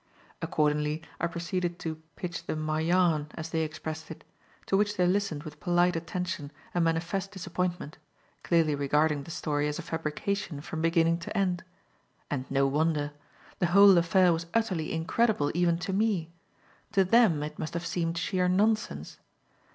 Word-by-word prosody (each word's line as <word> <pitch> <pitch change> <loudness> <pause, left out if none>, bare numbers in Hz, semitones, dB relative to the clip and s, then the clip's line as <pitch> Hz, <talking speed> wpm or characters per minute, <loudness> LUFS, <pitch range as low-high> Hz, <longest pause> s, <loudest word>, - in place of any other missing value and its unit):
Accordingly 150 +1 0 0.2
I - - +1
proceeded 175 +1 -3
to 160 -2 -5
"pitch 175 -2 -5
them 155 - -2
my 155 0 -1
yarn," 165 -2 +2
as 160 +1 -6
they 160 - +1
expressed 160 0 -5
it; 160 - -9 0.4
to - - +1
which 205 +1 +1
they 180 - +3
listened 180 -5 0
with 150 -2 -9
polite 175 0 +2
attention 165 -3 -4 0.2
and 175 - +2
manifest 175 +4 -1
disappointment, 180 -5 -3 0.4
clearly 165 -3 +2
regarding 145 +1 +1
the 155 - -11
story 150 -2 -1
as 150 - -2
a - - -5
fabrication 160 +1 -3
from 160 +2 -5
beginning 165 0 +3
to 170 - -5
end. 180 -3 0 0.7
And 130 -2 -3
no 135 0 +2
wonder. 150 +1 +1 0.5
The 175 - +2
whole 200 -1 +9
affair 175 +1 +4
was 165 +1 -3
utterly 190 -9 0
incredible 165 -1 +1
even 170 0 +2
to 175 +3 -4
me; 195 -5 0 0.6
to 195 - +5
them 190 -7 +4
it 150 - -6
must 155 - -4
have 170 - -3
seemed 165 -1 -1
sheer 180 +1 0
nonsense. 215 +4 0
165 Hz, 160 wpm, -29 LUFS, 155-180 Hz, 0.7 s, whole